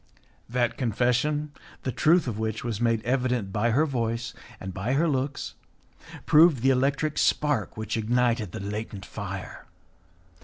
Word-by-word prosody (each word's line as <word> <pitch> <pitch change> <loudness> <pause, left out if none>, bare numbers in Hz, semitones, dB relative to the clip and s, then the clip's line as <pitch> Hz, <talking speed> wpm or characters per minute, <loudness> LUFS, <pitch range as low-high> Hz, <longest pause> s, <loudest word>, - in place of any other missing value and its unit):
That 120 -1 0
confession, 130 +5 +1 0.3
the 130 - -1
truth 165 +6 +3
of 110 -3 -3
which 110 -1 -2
was 115 -2 -3
made 115 -2 +1
evident 125 -5 0
by 110 +3 +1
her 140 +7 +3
voice 115 -4 -2 0.3
and 95 0 -6
by 100 +8 -2
her 155 +5 +3
looks, 140 -1 -2 0.7
proved 155 -5 +5
the 135 - +5
electric 140 +4 +1
spark 145 -11 +1
which 110 +1 -3
ignited 115 -2 +1
the - - -6
latent 100 0 -5
fire. 100 -2 -7
120 Hz, 145 wpm, -26 LUFS, 110-135 Hz, 0.7 s, proved